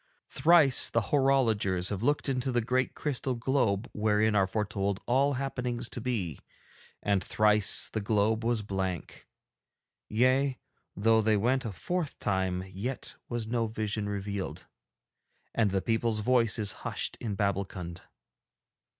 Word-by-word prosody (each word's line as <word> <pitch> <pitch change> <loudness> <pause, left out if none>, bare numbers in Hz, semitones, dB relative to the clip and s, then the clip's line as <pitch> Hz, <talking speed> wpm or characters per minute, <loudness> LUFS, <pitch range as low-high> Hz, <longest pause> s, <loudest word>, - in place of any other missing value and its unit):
Thrice 150 -3 +4
the 115 - +2
horologers 115 -10 +2
have 100 -1 -3
looked 145 +5 +1
into 130 -1 -1
the 120 - +2
great 130 +3 0
crystal 135 -3 -2
globe 115 -4 0
wherein 105 +1 +2
are 100 -2 +3
foretold 100 -1 -1
all 135 +3 +2
happenings 125 -3 -3
to - - -6
be, 100 - -2 0.6
and 100 -2 +1
thrice 105 -1 +3
the 110 - -3
globe 110 +2 +1
was 115 -2 0
blank. 95 -4 -4 0.8
Yea, 130 +4 +2 0.4
though 110 +2 +3
they 110 0 +3
went 125 +5 +1
a 115 - -3
fourth 165 - -3
time 95 -2 -1
yet 100 +8 -5 0.2
was 120 -2 -3
no 115 0 0
vision 110 -1 -3
revealed; 100 -1 -4 0.9
and 110 -3 +2
the 95 -1 -1
people's 110 0 0
voice 120 -1 +3
is 105 -3 +1
hushed - - -3
in 105 -4 -3
Babbulkund.' 95 -3 -2
110 Hz, 135 wpm, -29 LUFS, 100-125 Hz, 0.9 s, Thrice